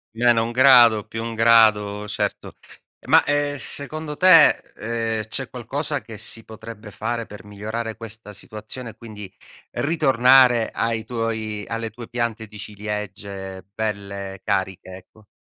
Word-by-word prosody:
-1 115 -1 +3
grado, 120 -4 +6
+1 115 +1 -5
grado, 105 -2 +4
certo. - - -3 0.5
Ma, - - +6
ehm, 145 0 0
secondo 150 +2 -5
te, 180 -4 +8 0.3
ehm, 115 -1 -2
c'è 130 +3 -4
qualcosa 140 +4 -2
che 110 -2 -10
si 115 +2 -2
potrebbe 110 -1 -11
fare 115 +3 -3
per 105 -1 -12
migliorare 110 +2 -5
questa 110 -2 -9
situazione 110 +5 -8
e, 105 - -21
quindi, 105 -4 -10 0.4
ritornare 130 -5 +4
ai 115 -1 -2
tuoi 110 -3 -3
alle 115 -1 -4
tue 115 +1 -10
piante 115 -2 -2
di 105 0 -13
ciliegie 100 -2 -6
belle 100 -3 -5
cariche, 95 -1 -2
ecco? 105 +3 -20
115 Hz, 130 wpm, -22 LUFS, 105-120 Hz, 0.5 s, te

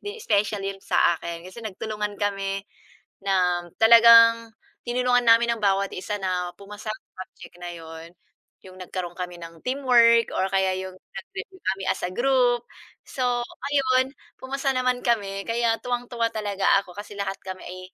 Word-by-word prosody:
din, 410 +2 -7
special 205 -1 0
'yun 195 0 -4
sa 175 - +2
akin 170 0 -7
kasi 185 +6 -10
nagtulungan 210 -1 -5
kami 195 -1 -2 0.6
nang 180 -3 +1
talagang 230 0 +7 0.3
tinulungan 245 0 +1
namin 235 0 +5
ang - - -13
bawat 195 0 +2
isa 205 +3 -4
na 180 -1 -2
pumasa 210 +3 -7
sa 185 -3 -11
subject - - -15
na 175 0 -7
'yon, 165 0 -10 0.5
'yung 185 -1 -14
nagkaroon 180 -1 -6
kami 180 -1 -6
ng 165 0 -10
teamwork, 240 -4 +4
or 190 - +1
kaya 190 -1 +2
'yung 185 0 -6
nag-review 375 - -10 0.2
kami 195 - -9
as - - -1
a 180 - -3
group. 245 0 +2 0.5
So, 255 - -4 0.5
ayun, 260 -2 +2 0.2
pumasa 270 +1 -2
naman 255 -1 +1
kami, 200 -5 -1
kaya 230 0 +1
tuwang-tuwa 245 -1 -2
talaga 205 -3 -2 0.2
ako 180 - -14
kasi 205 +2 -9
lahat 200 -1 -4
kami 185 -1 -8
ay, 185 +1 -8
205 Hz, 155 wpm, -24 LUFS, 185-235 Hz, 0.6 s, talagang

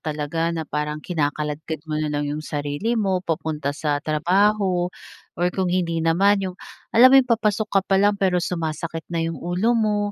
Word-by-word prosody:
talaga 155 +2 -2
na 160 -1 -3
parang 150 +1 -3
kinakaladkad 150 -1 -3
mo 155 -1 -3
na 155 - -1
lang 145 0 -1
'yong 150 +1 -3
sarili 145 +11 -2
mo 190 -4 +1
papunta 155 -4 -3
sa 145 -2 -1
trabaho. 180 +4 +1 0.5
Or 175 - +1
kung 185 -2 -1
hindi 170 -2 0
naman 195 +5 +3
'yong, 185 -1 -4 0.4
alam 245 +3 +9
mo - - +7
'yong 250 - -6
papasok 215 -1 +1
ka 195 - +3
pa 195 - +2
lang 205 +1 +4
pero 185 -2 +2
sumasakit 165 -1 -3
na 165 - 0
'yong 165 0 -3
ulo 180 +7 0
mo. 210 -1 +1
165 Hz, 185 wpm, -22 LUFS, 155-195 Hz, 0.5 s, alam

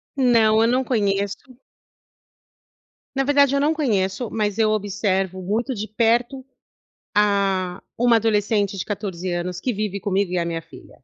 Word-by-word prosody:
Não, 230 -5 +4
eu 225 - +4
não 255 +2 +2
conheço. 200 -5 0 1.8
Na 270 - +1
verdade, 280 0 +3
eu - - +2
não 295 +3 +2
conheço, 220 -7 -1
mas 210 -2 -1
eu 220 -1 +3
observo 195 -2 -1
muito 220 +8 -1
de 215 0 -4
perto, 235 +4 0 0.7
ah, 195 -3 +1 0.2
uma 240 0 +4
adolescente 210 -2 +1
de 180 - -4
14 190 -4 -4
anos 175 +1 -3
que 250 - -2
vive 205 -1 -3
comigo 200 -2 -1
e 180 - -1
a 170 - 0
minha 165 -1 -3
filha, 165 -4 -16
210 Hz, 150 wpm, -22 LUFS, 190-235 Hz, 1.8 s, Não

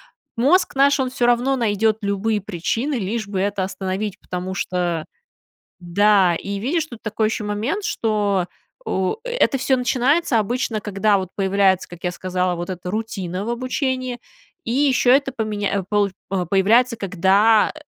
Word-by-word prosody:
м, 230 - -7
мозг 355 +6 +3
наш, 280 +1 +4
он 260 -1 0
всё 250 -1 -1
равно 245 +3 +2
найдет 220 -2 +1
любые 205 +1 -1
причины, 215 - -2
лишь 215 0 -3
бы 200 -2 -3
это 200 0 0
остановить. 190 +1 -4
Потому 180 +1 -5
что, 175 -4 -2 0.7
да, 185 0 +3
и 200 +4 -4
видишь, 310 - -1
тут 240 -6 -10
такой 220 0 0
еще 215 0 -3
момент, 220 - -2
что, 205 - 0 0.4
у 190 - -1
это - - +1
всё 265 +1 +2
начинается 255 +2 +2
обычно, 230 +1 -1
когда 205 0 +1
вот 185 -2 -4
появляется, 195 -1 +2
как 175 -1 -12
я 180 - 0
сказала, 180 0 -1
вот 175 +1 -5
эта 180 -1 -5
рутина 195 -3 -4
в - - -4
обучении, 255 0 -2 0.5
и 230 - -2
еще 265 -1 +2
это 275 -1 0
поменя 215 -4 -2
э, - - -4
полу 205 -1 +2 0.2
а, 185 -2 -1
появляется, 220 +7 +3
когда, 200 +3 +3
210 Hz, 160 wpm, -21 LUFS, 190-245 Hz, 0.7 s, наш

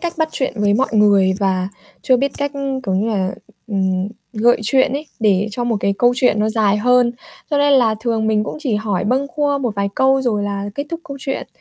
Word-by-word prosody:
cách 345 -1 -2
bắt 320 -1 +1
chuyện 265 - -1
với 205 -1 +2
mọi 260 +5 +1
người 200 -3 +4
và 190 -1 0 0.3
chưa 255 - +4
biết 275 +3 -1
cách, 285 0 -2 0.3
kiểu 190 -4 -2
như 205 +4 0
là, 190 -4 -1 0.3
ừm, 190 -2 0 0.2
gợi 235 +1 +3
chuyện 260 +4 +2
ấy 290 +3 -4
để 205 -1 +2
cho 240 +3 -3
một 230 -3 0
cái 200 0 +1
câu 245 0 +4
chuyện 250 -5 +2
nó 215 - +1
dài 215 -2 +2
hơn, 245 +2 +3 0.4
cho 290 - +1
nên 285 0 +3
là 235 -5 +4
thường 225 -2 -1
mình 215 -1 +1
cũng - - -5
chỉ 260 -8 -1
hỏi 210 -3 -1
bâng 260 +5 +1
quơ 290 -2 +1
một 245 -6 -2
vài 200 0 -1
câu 265 0 +3
rồi 220 -5 0
là 200 -1 -3
kết 285 +4 -4
thúc 335 0 -4
câu 280 -4 -7
chuyện, 270 -1 -4
225 Hz, 235 wpm, -18 LUFS, 205-265 Hz, 0.4 s, người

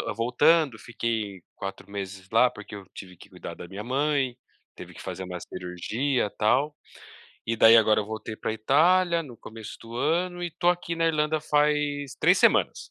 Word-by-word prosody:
voltando, 125 +4 +3
fiquei 110 -5 -3
4 95 0 -7
meses 95 -1 -7
lá 125 +3 +5
porque 105 -1 -10
eu 100 -1 -10
tive 90 -2 -10
que - - -16
cuidar - - -9
da 85 - -9
minha 100 +3 -7
mãe, 135 0 0 0.4
teve - - -11
que - - -11
fazer 95 +1 -6
uma 90 -1 -6
cirurgia 105 +9 -2
tal 135 +8 +2 0.7
e 115 - -1
daí 115 +1 +8
agora 110 -1 +4
eu 105 - -5
voltei 110 0 -6
para 110 - -3
Itália 170 +10 +3
no 130 -7 -11
começo 110 -1 -10
do 115 +1 -11
ano 175 +6 0
e 175 - -1
estou 175 +1 -1
aqui 175 -1 -2
na 165 0 +1
Irlanda 155 -1 +1
faz 150 -2 0
3 - - +5
semanas. - - +2
120 Hz, 175 wpm, -26 LUFS, 105-150 Hz, 0.7 s, daí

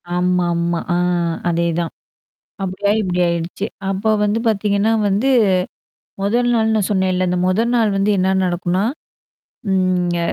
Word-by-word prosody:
ஆமாமா. 175 -1 0
ஆ - - +1 0.5
அதேதான். 170 0 -1 0.7
அப்படியாயி 200 +3 0
இப்படி 180 -2 -1
ஆயிடுச்சு. 170 +4 -3 0.2
அப்போ 195 +3 -1
வந்து 210 +2 +1
பாத்தீங்கன்னா 210 0 +1 0.2
வந்து 205 +7 +1 0.9
மொதல் 240 +5 +1
நாள்னு 220 -1 +2
சொன்னேன்ல்ல 185 -2 +1
அந்த 180 0 0
மொதல் 225 +6 +1
நாள் 220 -3 +2
வந்து 195 +2 +1
என்ன 190 +1 +2
நடக்குனா? 180 +2 -1 0.9
ம் 190 -1 +2 0.3
ங்க 175 - -1
190 Hz, 120 wpm, -19 LUFS, 175-210 Hz, 0.9 s, நாள்னு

